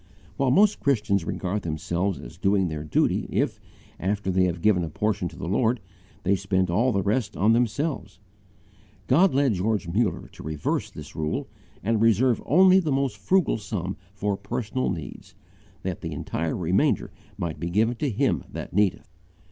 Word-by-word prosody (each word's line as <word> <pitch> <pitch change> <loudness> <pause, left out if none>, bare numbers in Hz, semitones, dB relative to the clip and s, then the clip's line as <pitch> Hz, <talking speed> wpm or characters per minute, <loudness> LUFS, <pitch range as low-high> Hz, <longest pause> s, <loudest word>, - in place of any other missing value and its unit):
While 135 -2 +1
most 200 +10 +4
Christians 105 - +1
regard 95 +4 -2
themselves 85 +3 -2
as - - -11
doing 95 -2 +2
their 75 -1 -4
duty 75 - +1
if, - - 0 0.4
after 100 +1 -1
they 95 0 +3
have 85 -2 -2
given 100 -5 +4
a 80 - -3
portion 100 +2 -1
to - - -10
the - - -6
Lord, 115 +5 +1 0.4
they 100 +2 +3
spend 95 -2 0
all 120 +8 +3
the 100 -3 0
rest 105 +1 -1
on 105 +4 +4
themselves, 120 - -1 0.9
God 165 - +4
led 140 -4 +3
George 100 0 -1
Muller 100 +3 0
to - - -13
reverse 75 0 -2
this 75 -1 -11
rule 75 -1 -2 0.4
and 110 +2 +1
reserve 115 +2 +3
only 185 +4 +6
the 160 -5 -1
most 135 -1 0
frugal 185 -10 +1
sum 95 -2 -4 0.2
for 100 0 -1
personal 120 +4 -2
needs, 85 -5 -7 0.5
that - - -3
the - - -4
entire 80 0 -3
remainder 90 +2 +1 0.3
might 80 -3 -4
be 85 +2 -3
given 110 +6 +2
to 145 +1 0
him 105 - +1
that - - -7
needeth. 100 -1 +1
100 Hz, 170 wpm, -25 LUFS, 90-120 Hz, 0.9 s, only